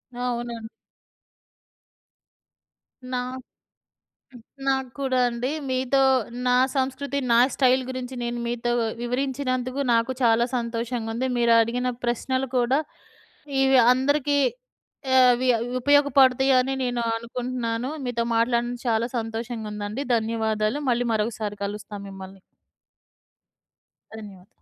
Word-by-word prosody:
అవునా! 240 Hz, -2 st, -4 dB, 2.5 s
నాక్ 255 Hz, +1 st, -4 dB, 0.9 s
హ్మ్, 240 Hz, -, -13 dB, 0.3 s
నాకు 265 Hz, -1 st, 0 dB
కూడా 260 Hz, -2 st, 0 dB
అండి. 240 Hz, +2 st, -3 dB, 0.2 s
మీతో 260 Hz, +1 st, +1 dB, 0.5 s
నా 250 Hz, -, +4 dB, 0.2 s
సంస్కృతి 270 Hz, +2 st, -1 dB
నా 235 Hz, -, +6 dB, 0.2 s
స్టైల్ 260 Hz, -1 st, +3 dB
గురించి 255 Hz, 0 st, -5 dB
నేను 240 Hz, 0 st, -3 dB
మీతో 240 Hz, 0 st, -2 dB, 0.3 s
వివరించినందుకు 255 Hz, +1 st, -2 dB
నాకు 230 Hz, +3 st, +1 dB
చాలా 230 Hz, 0 st, +4 dB
సంతోషంగా 235 Hz, -1 st, -3 dB
ఉంది. 250 Hz, +3 st, -1 dB
మీరు 235 Hz, -1 st, +3 dB
అడిగిన 245 Hz, +2 st, -1 dB, 0.2 s
ప్రశ్నలు 260 Hz, +2 st, -1 dB
కూడా 245 Hz, +3 st, +2 dB, 0.8 s
ఇవి 265 Hz, -1 st, +5 dB
అందరికి 285 Hz, +2 st, +1 dB, 0.8 s
ఆహ్, 260 Hz, -, +7 dB
అవి 250 Hz, +2 st, -1 dB, 0.3 s
ఉపయోగపడతాయని 270 Hz, -2 st, +4 dB
నేను 245 Hz, -1 st, -1 dB, 0.2 s
అనుకుంటున్నాను. 240 Hz, +1 st, -3 dB
మీతో 235 Hz, -2 st, -1 dB
మాట్లాడడం 240 Hz, +1 st, +1 dB
చాలా 230 Hz, +1 st, +1 dB
సంతోషంగా 225 Hz, 0 st, -4 dB
ఉందండి. 210 Hz, +5 st, -4 dB
ధన్యవాదాలు. 220 Hz, +1 st, 0 dB
మళ్ళీ 245 Hz, 0 st, +1 dB
మరొకసారి 215 Hz, -1 st, -2 dB
కలుస్తా 205 Hz, +1 st, -6 dB
మిమ్మల్ని. 195 Hz, 0 st, -10 dB, 1.7 s
ధన్యవాదాలు. 200 Hz, -4 st, -11 dB
245 Hz, 100 wpm, -24 LUFS, 230-260 Hz, 2.5 s, ఆహ్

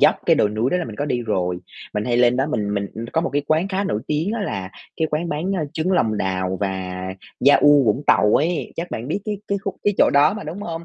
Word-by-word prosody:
dốc, -, -, +6 dB
cái -, -, +5 dB
đồi 105 Hz, -, +3 dB
núi 110 Hz, +5 st, -1 dB
đó 180 Hz, -, +2 dB
là 180 Hz, -, -1 dB
mình 110 Hz, -3 st, -8 dB
có 145 Hz, -, -1 dB
đi 125 Hz, -5 st, -1 dB
rồi, 90 Hz, -5 st, -1 dB, 0.4 s
mình 105 Hz, 0 st, -1 dB
hay 120 Hz, 0 st, +1 dB
lên 120 Hz, 0 st, +4 dB
đó 135 Hz, +2 st, +1 dB
mình 105 Hz, -7 st, -1 dB
mình 100 Hz, -1 st, -1 dB
ừm, 115 Hz, -, -5 dB
có 165 Hz, -, +2 dB
một 170 Hz, -, -2 dB
cái 145 Hz, 0 st, +1 dB
quán 160 Hz, +5 st, +1 dB
khá 195 Hz, +1 st, -1 dB
nổi 105 Hz, -, -1 dB
tiếng 155 Hz, +7 st, -1 dB
á 230 Hz, -, -2 dB
là 95 Hz, -, -4 dB, 0.3 s
cái 160 Hz, -, 0 dB
quán 160 Hz, +3 st, -1 dB
bán, 170 Hz, +6 st, -2 dB
a, 170 Hz, -, -1 dB
trứng 165 Hz, +4 st, -1 dB
lòng 110 Hz, -, +2 dB
đào 95 Hz, -1 st, -1 dB
và 95 Hz, -2 st, -3 dB, 0.5 s
yaourt 145 Hz, -1 st, +6 dB
Vũng 110 Hz, +6 st, +1 dB
Tàu 105 Hz, -, +4 dB
ấy, 165 Hz, +3 st, -1 dB
chắc 170 Hz, +1 st, -4 dB
bạn 115 Hz, +4 st, -5 dB
biết 195 Hz, -, -1 dB
cái 210 Hz, -1 st, -2 dB
cái 200 Hz, -, 0 dB
khúc 195 Hz, -1 st, -5 dB
cái 205 Hz, -, +2 dB
chỗ -, -, +5 dB
đó 145 Hz, +7 st, +5 dB
mà, 215 Hz, -, -6 dB
đúng 160 Hz, +6 st, -6 dB
hông? 165 Hz, -3 st, -5 dB
145 Hz, 275 wpm, -21 LUFS, 105-170 Hz, 0.5 s, dốc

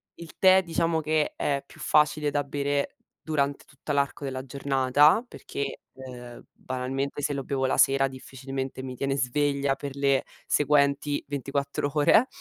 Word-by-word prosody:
il 170 Hz, -1 st, -12 dB
tè 190 Hz, 0 st, +6 dB
diciamo 165 Hz, -2 st, 0 dB
che 155 Hz, 0 st, 0 dB
è 140 Hz, -1 st, -1 dB
più -, -, -17 dB
facile 150 Hz, 0 st, +3 dB
da 145 Hz, 0 st, 0 dB
bere 140 Hz, 0 st, -2 dB, 0.3 s
durante 140 Hz, -3 st, -1 dB
tutta 135 Hz, +2 st, -8 dB
l'arco 140 Hz, 0 st, 0 dB
della 130 Hz, -1 st, -4 dB
giornata 140 Hz, -, +3 dB
perché, 140 Hz, -, -5 dB
ehm, 125 Hz, -2 st, -10 dB
banalmente 135 Hz, +3 st, -4 dB
se 145 Hz, -, 0 dB
lo 140 Hz, -1 st, -3 dB
bevo 135 Hz, 0 st, -1 dB
la 130 Hz, -, +1 dB
sera 135 Hz, 0 st, +4 dB
difficilmente 130 Hz, 0 st, -6 dB
mi 130 Hz, -1 st, -6 dB
tiene 135 Hz, +2 st, -1 dB
sveglia 140 Hz, +2 st, +1 dB
per 140 Hz, 0 st, -7 dB
le 140 Hz, -1 st, +2 dB, 0.2 s
seguenti 145 Hz, 0 st, +2 dB
24 140 Hz, 0 st, -2 dB
ore. 150 Hz, -, +5 dB
140 Hz, 150 wpm, -26 LUFS, 135-145 Hz, 0.3 s, tè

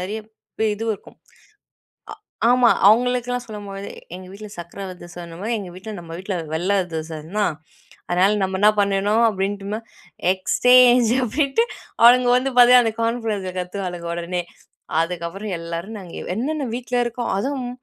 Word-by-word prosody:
நிறைய 200 Hz, +4 st, -3 dB, 0.4 s
பெ 220 Hz, -, +1 dB
இதுவும் 225 Hz, +1 st, -2 dB
இருக்கும். 195 Hz, -, -16 dB, 1.3 s
அ -, -, +5 dB
ஆமா. 250 Hz, -2 st, +5 dB, 0.2 s
அவுங்களுக்குல்லாம் 245 Hz, +2 st, +3 dB
சொல்லும்போது 200 Hz, -2 st, -7 dB, 0.2 s
எங்க 185 Hz, 0 st, -9 dB
வீட்ல 210 Hz, +1 st, -9 dB
சர்க்கல 175 Hz, +3 st, -7 dB
அதிரசம் 175 Hz, 0 st, -10 dB
அந்தமாரி 175 Hz, +7 st, -5 dB
எங்க 190 Hz, -3 st, -7 dB
வீட்ல 205 Hz, +4 st, -8 dB
நம்ம 165 Hz, -1 st, -11 dB
வீட்ல 190 Hz, +1 st, -4 dB, 0.2 s
வெள்ள 180 Hz, +5 st, 0 dB
அதிரசன்னா, 160 Hz, +4 st, -4 dB, 0.6 s
அதனா 180 Hz, +1 st, +3 dB, 0.2 s
நம்ம 190 Hz, 0 st, -2 dB
என்ன 210 Hz, +1 st, +7 dB
பண்ணணும்? 200 Hz, +3 st, +2 dB
அப்பிடின்ட்டும 200 Hz, +1 st, -2 dB, 0.5 s
எக்ஸ்சேஞ்ச் 245 Hz, +4 st, +5 dB
அப்பிடின்ட்டு 275 Hz, -, +1 dB, 0.4 s
அவுளுங்க 245 Hz, +1 st, +7 dB
வந்து 265 Hz, +2 st, 0 dB
பார்த்தியா, 245 Hz, +1 st, +8 dB
அந்த 225 Hz, -, 0 dB
கார்ன்ஃப்வர்ஸ்ல 225 Hz, -5 st, -1 dB
கத்துவாளுக 180 Hz, -2 st, -4 dB
உடனே, 175 Hz, +1 st, -3 dB, 0.6 s
அதுக்கப்பறம் 180 Hz, +4 st, -3 dB
எல்லாரும் 170 Hz, +6 st, -5 dB
நாங்க 180 Hz, -3 st, -11 dB, 0.2 s
என்னென்ன 290 Hz, +5 st, -2 dB
வீட்ல 245 Hz, 0 st, -3 dB
இருக்கோ 240 Hz, +1 st, -4 dB
அதுவும் 260 Hz, +3 st, -2 dB
205 Hz, 135 wpm, -22 LUFS, 180-240 Hz, 1.3 s, பார்த்தியா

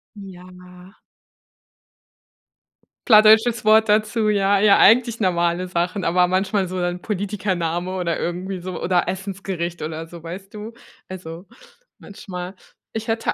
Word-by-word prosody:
Ja. 180 Hz, -1 st, -14 dB, 2.1 s
Plattdeutsches 220 Hz, 0 st, +5 dB
Wort 220 Hz, 0 st, +5 dB
dazu, 215 Hz, +1 st, +1 dB
ja. 200 Hz, -1 st, +2 dB
Ja, 205 Hz, -1 st, +5 dB
eigentlich 230 Hz, +1 st, +4 dB
normale 175 Hz, -1 st, 0 dB
Sachen, 180 Hz, +2 st, -2 dB
aber 180 Hz, +1 st, +2 dB
manchmal 190 Hz, +1 st, 0 dB
so 185 Hz, 0 st, -5 dB
dann 175 Hz, 0 st, -2 dB
Politikername 185 Hz, -3 st, -3 dB
oder 170 Hz, -3 st, -2 dB
irgendwie 180 Hz, +2 st, -4 dB
so 180 Hz, 0 st, -6 dB
oder 175 Hz, 0 st, +1 dB
Essensgericht 185 Hz, -2 st, -5 dB
oder 160 Hz, +1 st, -5 dB
so, 170 Hz, -1 st, -12 dB
weißt 190 Hz, +5 st, -9 dB
du? 215 Hz, +2 st, -8 dB, 0.3 s
Also, 175 Hz, -1 st, -9 dB, 0.5 s
manchmal 185 Hz, -2 st, -9 dB, 0.4 s
ich 220 Hz, +1 st, -5 dB
hätte 225 Hz, 0 st, -1 dB
185 Hz, 120 wpm, -21 LUFS, 175-210 Hz, 2.1 s, Plattdeutsches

